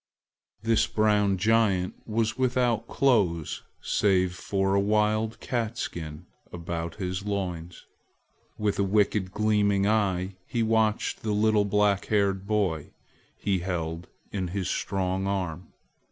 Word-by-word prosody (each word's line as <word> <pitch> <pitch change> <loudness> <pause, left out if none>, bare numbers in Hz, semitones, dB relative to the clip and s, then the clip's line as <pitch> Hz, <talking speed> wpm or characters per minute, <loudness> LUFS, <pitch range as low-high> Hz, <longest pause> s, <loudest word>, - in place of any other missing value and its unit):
This 115 -1 +3
brown 105 -2 +2
giant 100 -3 +2
was 110 0 0
without 125 -3 +1
clothes 100 - +1 0.2
save 95 -3 +2
for 95 +1 -1
a 100 - +4
wild 110 +2 +1
cat 120 -2 -2
skin 80 -8 -5 0.3
about 85 -1 -4
his 95 -1 -3
loins. 90 -4 -4 0.7
With 105 -2 -1
a - - +4
wicked 100 -1 +2
gleaming 105 -1 +2
eye, 95 -3 +1
he 115 -2 0
watched 110 -1 +1
the 110 -1 -1
little 105 0 +3
black 100 -1 +2
haired 100 -2 +1
baby 95 -8 -1 0.4
he 100 -2 0
held 85 -1 -3 0.2
in 95 -3 -2
his 95 +1 -3
strong 95 0 -1
arm. 90 -3 -3
100 Hz, 125 wpm, -27 LUFS, 90-110 Hz, 0.7 s, a